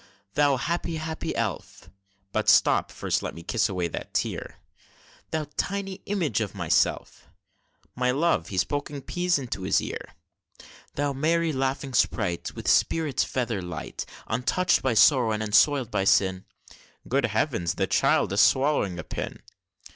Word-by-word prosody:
Thou 145 -2 +3
happy, 170 +4 -2
happy 160 0 -4
elf! - - -4 0.4
(But - - +1
stop, - - +4
first - - -1
let - - -5
me 85 - -9
kiss 110 +4 0
away 90 -3 -1
that - - -7
tear) - - -2 0.7
Thou 155 -1 -2
tiny 195 -1 -3
image 165 - 0
of 105 -4 -4
myself! - - 0 0.7
(My 125 0 +1
love, 155 +7 +1
he's 95 -2 +1
poking 145 -1 -4
peas 175 -1 0
into 125 -8 -5
his 95 - +2
ear!) - - -6 0.8
Thou 145 0 0
merry, 160 +3 +1
laughing 135 0 -2
sprite! 95 -8 0
With - - -7
spirits 155 -5 +2
feather 115 -6 -2
light, 90 -2 -6 0.2
Untouch'd 125 +10 +1
by 130 -3 0
sorrow, 120 -1 +5
and 105 0 -2
unsoil'd 120 +4 +3
by 95 -2 0
sin 95 -1 +2 0.6
(Good 135 0 +1
heav'ns! 110 - -1
the - - +1
child 95 - +2
is 100 - +4
swallowing 130 -10 +3
a 90 - -5
pin!) - - -6
130 Hz, 145 wpm, -26 LUFS, 105-155 Hz, 0.8 s, sorrow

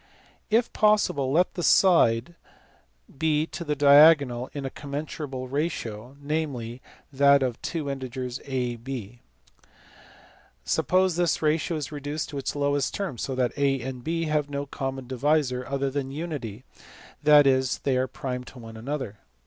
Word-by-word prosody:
If 225 +2 +2
possible 210 -11 +2
let 175 +5 +2
the 175 - -4
side 165 -8 +4 0.9
be 155 -1 +2
to 170 - -7
the 150 -2 -1
diagonal 140 -3 +6
in 140 -2 -5
a 135 - -4
commensurable 140 -2 -5
ratio, 130 -4 -4
namely, 140 -5 -3 0.3
that 140 0 +5
of 125 -2 0
the - - -26
two 160 -4 -4
integers 130 -2 -4
a 125 -3 -1
and 115 -1 -12
b. 120 -3 -7 1.4
Suppose 185 -2 +2
this 175 -2 +1
ratio 155 +1 +1
reduced 145 +1 -4
to 140 - -5
its 135 - -3
lowest 145 -1 0
terms 185 - -4
so 135 - -3
that 125 -2 0
a 140 -1 +1
and 130 0 -6
b 165 +3 -1
have 150 -2 0
no 140 0 -3
common 135 -1 -5
divisor 130 0 0
other 140 0 -1
than 135 -1 -3
unity, 140 -8 -5 0.6
that 150 -1 +7
is, 130 -1 +2
they 135 -2 +1
are 130 +1 +1
prime 125 -1 -5
to 130 - -13
one 115 -2 -10
another. 130 -3 -5
140 Hz, 155 wpm, -26 LUFS, 130-150 Hz, 1.4 s, that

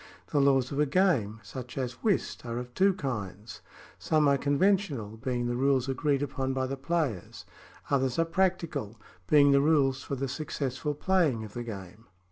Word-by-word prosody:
The 145 - +3
laws 135 -2 +3
of 140 - -2
a 150 - +3
game, 135 - +2
such 125 +6 -8
as 125 -1 -4
whist, 210 -4 0
are 115 -1 -4
of 125 0 -6
two 190 +3 +3
kinds: 110 - -5 0.4
some 155 -2 +2
are 140 - +5
conventional, 145 - +1
being 125 0 -2
the 120 0 -1
rules 135 0 +2
agreed 140 +1 0
upon 135 -1 -2
by 130 0 -1
the 135 +1 -3
players; 135 - -3 0.5
others 135 -2 +1
are 165 - +3
practical, 165 - -1 0.3
being 145 -2 +6
the 140 0 +5
rules 140 -3 +2
for 140 - -4
the 135 +1 -2
successful 140 0 -3
playing 155 -9 +1
of 105 - -9
the 120 - -4
game. 105 -2 -8
135 Hz, 175 wpm, -29 LUFS, 120-150 Hz, 0.5 s, being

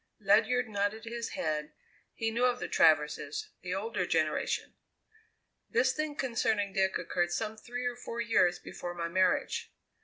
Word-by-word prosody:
Ledyard 220 +5 +3
nodded 205 +1 -1
his 235 0 -4
head; 155 -1 -2 0.4
he 225 0 -1
knew 240 +2 +2
of 250 0 +2
the - - -3
Traverses 150 -2 +2
the 180 0 -3
older 195 -3 -2
generation. 155 -1 0 1.0
"This 260 +1 +3
thing 310 0 -2
concerning 220 -7 0
Dick 190 -1 +2
occurred 175 0 -1
some 220 +4 -2
three 245 +3 -6
or 245 0 -1
four 235 -1 -6
years 215 -7 +3
before 175 0 -7
my 170 -1 -2
marriage. 185 +1 +1
205 Hz, 150 wpm, -31 LUFS, 175-235 Hz, 1.0 s, Ledyard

